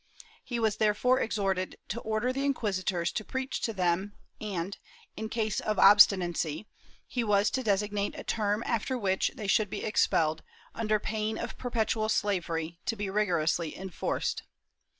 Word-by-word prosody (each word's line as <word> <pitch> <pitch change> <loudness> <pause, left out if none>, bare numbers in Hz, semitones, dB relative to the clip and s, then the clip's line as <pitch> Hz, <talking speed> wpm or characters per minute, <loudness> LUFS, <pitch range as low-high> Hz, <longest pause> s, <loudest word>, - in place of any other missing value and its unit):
He 240 -2 -3
was 220 -2 +1
therefore 220 +5 +3
exhorted 195 -5 -1
to 225 - -3
order 220 +3 -1
the 275 +1 -2
inquisitors 190 -10 0
to 215 - -3
preach 260 +3 -3
to 225 - 0
them 190 0 0 0.3
and, 195 -3 -3 0.4
in 220 0 -4
case 220 -2 -1
of 215 -1 -1
obstinacy, 185 -4 +5 0.4
he 245 - -2
was 205 -1 +3
to 260 - 0
designate 205 -2 0
a - - -6
term 210 0 0
after 245 +3 -1
which 190 -4 +1
they 210 - -6
should 205 +1 +2
be - - -5
expelled, 160 -6 +2 0.3
under 215 -1 +1
pain 215 +1 -2
of - - -5
perpetual 220 -3 -1
slavery, 170 -6 -1
to 225 - +1
be 205 -2 -3
rigorously 170 -5 0
enforced. 190 -3 -2
210 Hz, 150 wpm, -29 LUFS, 190-220 Hz, 0.4 s, obstinacy